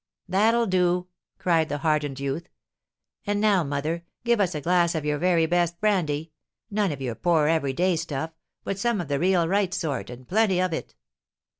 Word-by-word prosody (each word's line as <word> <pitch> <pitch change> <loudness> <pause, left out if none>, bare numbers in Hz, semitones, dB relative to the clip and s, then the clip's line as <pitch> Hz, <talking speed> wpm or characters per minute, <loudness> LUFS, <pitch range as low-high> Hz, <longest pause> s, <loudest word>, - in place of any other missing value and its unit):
"That'll 220 +5 +3
do!" 180 -2 +1 0.3
cried 165 -3 +1
the 145 - -2
hardened 150 -3 0
youth. 140 +5 -3 0.8
"And 205 0 +1
now, 205 -4 +3
mother, 150 +4 -2 0.2
give 235 -2 +2
us 180 -4 +1
a 150 - -3
glass 175 +1 +2
of 155 -2 -2
your 150 -1 0
very 175 -1 +3
best 175 0 0
brandy; 165 -7 0 0.4
none 205 -3 +1
of 140 -2 -6
your 125 -3 -2
poor, 160 +4 +2
every 155 -4 +1
day 180 +5 +2
stuff, 155 0 -3 0.3
but 195 - -3
some 235 0 +1
of 170 -5 -4
the 140 -1 0
real 180 -1 +3
right 195 +1 +1
sort, 150 -5 -3
and 125 0 -10
plenty 200 -2 +2
of 185 -2 0
it. - - -5
170 Hz, 185 wpm, -25 LUFS, 150-185 Hz, 0.8 s, That'll